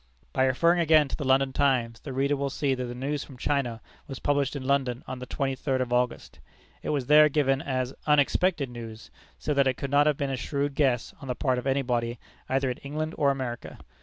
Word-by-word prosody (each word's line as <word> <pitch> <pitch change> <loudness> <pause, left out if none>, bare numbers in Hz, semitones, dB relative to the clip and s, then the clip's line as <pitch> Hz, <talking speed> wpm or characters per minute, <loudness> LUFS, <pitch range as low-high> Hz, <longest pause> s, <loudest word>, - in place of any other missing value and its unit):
By 130 - +3
referring 170 +7 +3
again 155 -3 +5
to - - -3
the 145 - -5
London 135 0 +3
Times, 125 -5 +1
the 140 - -8
reader 140 +2 +1
will 140 0 -2
see 135 0 0
that 130 -1 -3
the 120 0 -6
news 140 +3 -2
from 135 - -13
China 125 -5 -1 0.3
was 135 - -6
published 145 0 0
in 135 -2 -5
London 130 -2 0
on 130 0 -5
the 125 - -7
twenty 135 -1 -1
third 130 0 -1
of 125 -1 -1
August. 125 0 -1 0.4
It - - -5
was 140 -4 0
there 150 +2 +7
given 135 -2 +1
as 130 -1 -2
unexpected 150 +2 +3
news, 115 -2 -9 0.3
so 150 - -2
that 140 -1 +3
it 130 -1 0
could 140 - -4
not 145 +1 +4
have 150 -2 +2
been 140 -2 -2
a 135 - -2
shrewd 140 +2 -2
guess 130 -5 +1
on 135 - -8
the 125 - -2
part 130 -2 0
of 125 - -5
anybody 125 -3 0 0.3
either 135 0 +1
in 125 - -5
England 155 +3 -4
or 145 -2 +2
America. 130 -3 -4
135 Hz, 225 wpm, -27 LUFS, 125-145 Hz, 0.4 s, there